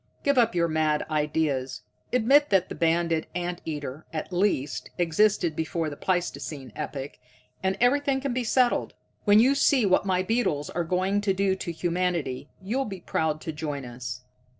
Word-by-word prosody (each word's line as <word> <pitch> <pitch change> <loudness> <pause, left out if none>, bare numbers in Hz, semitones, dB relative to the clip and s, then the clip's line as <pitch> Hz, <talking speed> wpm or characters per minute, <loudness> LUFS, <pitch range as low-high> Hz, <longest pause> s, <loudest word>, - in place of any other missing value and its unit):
"Give 280 0 +3
up 230 -4 +3
your 170 -1 +3
mad 155 -1 +1
ideas. 150 -4 0 0.3
Admit 270 +5 +4
that 190 -2 +2
the - - -4
banded 165 -1 +1
ant 175 0 -3
eater, 145 -2 -5
at 160 +3 -5
least, 175 -8 0
existed 175 -1 +2
before 160 0 -2
the - - -6
pleistocene 145 -7 -3
epoch, 135 0 -5 0.4
and 190 0 0
everything 275 +2 +3
can 270 -2 -2
be 250 0 -1
settled. 245 +1 +2 0.3
When 205 0 +6
you 255 +5 +5
see 275 -3 +3
what 185 -1 +3
my 185 -1 +2
beetles 185 -9 0
are 175 - -1
going 185 +4 0
to 195 -2 +1
do 195 0 +2
to 170 - -4
humanity, 170 -5 -2
you'll 250 +8 -1
be 195 -4 -7
proud 155 -2 -1
to 160 - -4
join 150 -3 -4
us. 125 +1 -6
175 Hz, 170 wpm, -26 LUFS, 155-205 Hz, 0.4 s, When